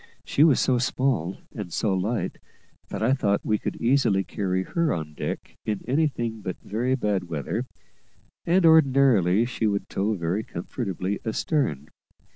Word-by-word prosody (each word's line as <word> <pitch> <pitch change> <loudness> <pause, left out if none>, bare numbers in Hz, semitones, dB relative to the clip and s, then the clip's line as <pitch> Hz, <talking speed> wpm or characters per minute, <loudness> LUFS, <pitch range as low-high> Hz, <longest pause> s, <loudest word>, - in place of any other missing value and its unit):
She 145 - +3
was 155 -5 +5
so 125 -2 +2
small 125 - 0 0.2
and 100 -6 -6
so 105 +3 0
light, 105 +6 -2 0.5
that - - -3
I 125 +4 +4
thought 100 -7 +1
we 105 -1 +1
could - - -3
easily 115 -6 +2
carry 95 -3 -1
her 170 - 0
on 80 -3 -3
deck - - -5
in 105 -2 -3
anything 125 -6 0
but 95 -3 -4
very 125 +5 0
bad 105 -7 -1
weather, 80 -6 -3 0.8
and, 175 +1 +3
ordinarily, 130 - +5
she 120 -2 -1
would 100 -1 -1
tow 105 +3 0
very 90 +4 -1
comfortably 95 +1 -4
astern. 110 - -1
110 Hz, 150 wpm, -25 LUFS, 95-130 Hz, 0.8 s, was